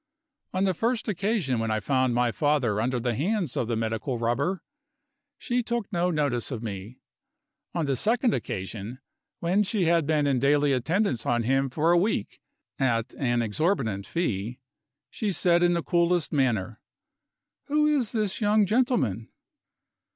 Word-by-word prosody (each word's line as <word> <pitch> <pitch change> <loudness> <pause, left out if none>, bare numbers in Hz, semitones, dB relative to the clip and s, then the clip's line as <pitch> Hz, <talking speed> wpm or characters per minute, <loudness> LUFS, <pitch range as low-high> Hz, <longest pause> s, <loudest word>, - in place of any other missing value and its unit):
On 185 - 0
the 190 -1 +2
first 230 +6 -1
occasion 195 - 0
when 115 0 -1
I 110 0 0
found 130 +3 +1
my 120 -1 +2
father 130 -7 +1
under 125 +2 0
the 120 0 -1
hands 175 - -1
of 120 - -1
the 115 - -1
Medical 115 +3 -2
Rubber, 140 +11 -1 0.7
she 245 -2 -1
took 235 -3 -3
no 175 +1 +1
notice 145 -8 0
of 120 -4 -5
me. 105 +2 -6 0.8
On 170 -3 0
the 140 -1 0
second 230 - +1
occasion 100 +5 -4 0.4
when 180 +4 +2
she 205 -2 0
had 165 -2 +2
been 155 -2 +2
in 135 -3 +2
daily 145 +1 +3
attendance 135 - 0
on 120 -1 +1
him 135 +3 +1
for 160 +6 +1
a 175 - +5
week, 185 - -2 0.4
at 115 -4 0
an 120 -3 +1
exorbitant 110 - -1
fee 120 - -2 0.5
she 210 -2 -2
said 175 -1 +3
in 175 0 +4
the 170 - -1
coolest 170 -1 +1
manner: 120 -6 0 0.9
"Who 300 +1 +2
is 285 -7 +1
this 215 -3 -1
young 210 0 +4
gentleman?" 220 - 0
145 Hz, 160 wpm, -26 LUFS, 120-190 Hz, 0.9 s, a